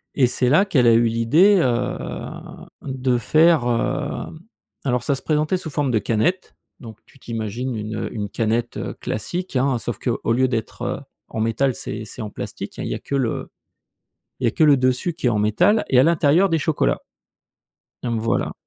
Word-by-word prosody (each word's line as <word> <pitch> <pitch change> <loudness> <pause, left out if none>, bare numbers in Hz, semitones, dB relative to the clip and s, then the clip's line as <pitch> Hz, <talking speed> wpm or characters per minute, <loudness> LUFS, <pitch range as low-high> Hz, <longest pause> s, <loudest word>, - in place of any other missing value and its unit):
Et 130 -3 +4
c'est 125 0 0
là 175 +9 +5
qu'elle 130 -11 +3
a 115 - +7
eu 115 +1 +4
l'idée, 145 - +4
heu, 125 -4 -2 0.5
de 130 -2 -1
faire, 155 +1 +4
heu 115 +5 -2 0.5
alors 125 -3 0
ça 140 - +1
se - - -7
présentait 155 +3 +1
sous 175 -3 -6
forme 140 -2 -1
de 110 - +2
canette, 155 - -1 0.2
donc 110 -3 -10
tu 135 - -22
t'imagines 115 +2 -4
une, 110 0 -4
heu, - - -4
une 105 -2 -4
canette, 115 +1 -1
heu, - - -4
classique, 175 - -4
hein, 130 0 +2
sauf 115 -2 -5
qu'au 115 -1 -1
lieu 130 +2 +3
d'être 115 -3 -4 0.2
en - - -6
métal 115 +4 +1
c'est 110 +1 -5
c'est 115 - -8
en 105 - -6
plastique, - - -7
hein, - - -3
il - - -3
y - - -2
a - - -6
que - - -8
le 130 -4 -2 0.9
il - - -4
y - - +4
a - - +1
que 155 - +2
le 145 -2 +6
dessus 130 +6 0
qui 160 -6 -3
est - - +2
en 110 - 0
métal 175 - +3
et 125 - +4
à - - +8
l'intérieur 165 +4 +4
des 165 - +1
chocolats. 145 - +1 1.1
Hem 120 -2 -1
voilà. 115 +1 -1
125 Hz, 200 wpm, -22 LUFS, 115-150 Hz, 1.1 s, à